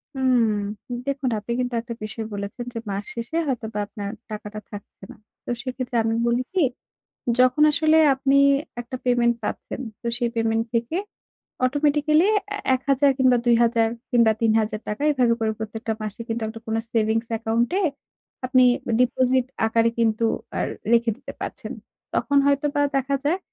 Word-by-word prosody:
হুম, 230 -4 0
দেখুন 275 -2 -1
আপনি 210 +3 -7
কিন্তু 250 -1 -1
একটা 235 0 -7
বিষয় 220 +1 -5
বলেছেন, 200 +4 -5
যে 230 - -3
মাস 200 +1 -2
শেষে 235 +8 -4
হয়তোবা 225 -5 -3
আপনার 205 -2 -6 0.2
টাকাটা 215 0 -6
থাকছে 205 -1 -11
না। - - -12 0.3
তো - - -8
সেক্ষেত্রে 255 -1 -3
আমি 225 0 0
বলি 235 +1 +2
কি, 370 -3 +3 0.8
যখন 255 +4 +4
আসলে 315 +1 +3 0.2
আপনি 270 +1 +2 0.4
একটা 240 +2 -6
পেমেন্ট 240 -1 +3
পাচ্ছেন, - - -4 0.2
তো - - -6
সেই 240 -1 +1
পেমেন্ট 225 0 +1
থেকে 235 +8 0 0.7
অটোমেটিক্যালি 295 +4 +3 0.2
অ্যা 410 - -3 0.2
১,০০০, 275 +2 +2
কিংবা 255 -2 +4
২,০০০, 235 -1 +4 0.2
কিংবা 235 -2 +5
৩,০০০ 220 -1 +1
টাকা 210 +5 -4
এভাবে 250 -4 +3
করে 220 -1 +1
প্রত্যেকটা 220 +1 -3
মাসে 215 +1 -5
কিন্তু, 230 +1 -3
একটা 225 +1 -7
কোন 220 - -2 0.2
সেভিংস 225 0 +1
account 225 +1 0
এ - - 0 0.6
আপনি 255 0 +4 0.4
ডিপোজিট 255 0 +2 0.2
আকারে 230 +1 +3
কিন্তু, 225 0 +2 0.3
আর - - 0 0.2
রেখে 235 -1 +4
দিতে - - -9
পারছেন। - - -5 0.4
তখন 285 0 +1
হয়তোবা 285 +1 +2
দেখা 275 +1 +1
যায়, 340 +6 +2
235 Hz, 155 wpm, -23 LUFS, 225-260 Hz, 0.8 s, কিংবা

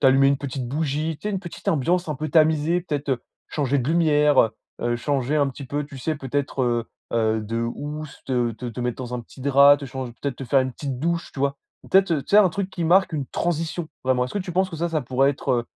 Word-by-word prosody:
t'allumer 135 +1 +5
une 140 - +3
petite 135 -2 -4
bougie, 155 +2 -1
tu 210 - -4
sais, 210 - -2
une 190 - -2
petite 175 -3 -7
ambiance 170 +4 +1
un 150 - -1
peu 155 +3 -4
tamisée? 160 +2 +3
Peut-être, 145 -4 -3
heu, 125 -3 0 0.3
changer 140 -2 0
de 130 +1 -1
lumière, 150 -4 +3
heu 110 - 0 0.3
heu 120 0 +1
changer 140 +3 0
un 140 -2 +3
petit 135 +2 -8
peu, 145 +3 -2
tu 140 - -11
sais, 155 +4 -1
peut-être 140 -1 -2
heu 120 -1 +1 0.3
heu 110 -1 +2
de 115 +2 -2
housse, 150 +5 -5
te 120 -3 0
te 115 +3 -7
te 120 +1 -5
mettre 120 -1 -1
dans 125 0 -5
un 125 - -3
petit 120 - -15
drap, 140 +1 +7
te 140 - -7
change 130 -1 -5
peut-être 140 -3 -3
te 135 - -6
faire 135 +2 +3
une 130 -1 -2
petite 135 -3 -5
douche, 170 +3 -1
tu 135 - -7
vois? 140 0 +1 0.3
Peut-être, 190 -1 +5
heu 145 -4 0
tu - - -13
sais, 205 - +7
un 200 -3 +7
truc 195 +2 -3
qui 170 -3 -3
marque 185 +1 +4
une 145 -3 -2
transition, 165 +2 -2 0.2
vraiment. 130 -1 +2
Est-ce 125 - -7
que - - +1
tu 185 -2 -5
penses 185 +2 +1
que 165 - -6
ça, 170 +2 -1
ça 160 -3 -1
pourrait 130 +2 +2
être, 140 - -8
heu 120 -1 +1
140 Hz, 260 wpm, -24 LUFS, 130-160 Hz, 0.3 s, drap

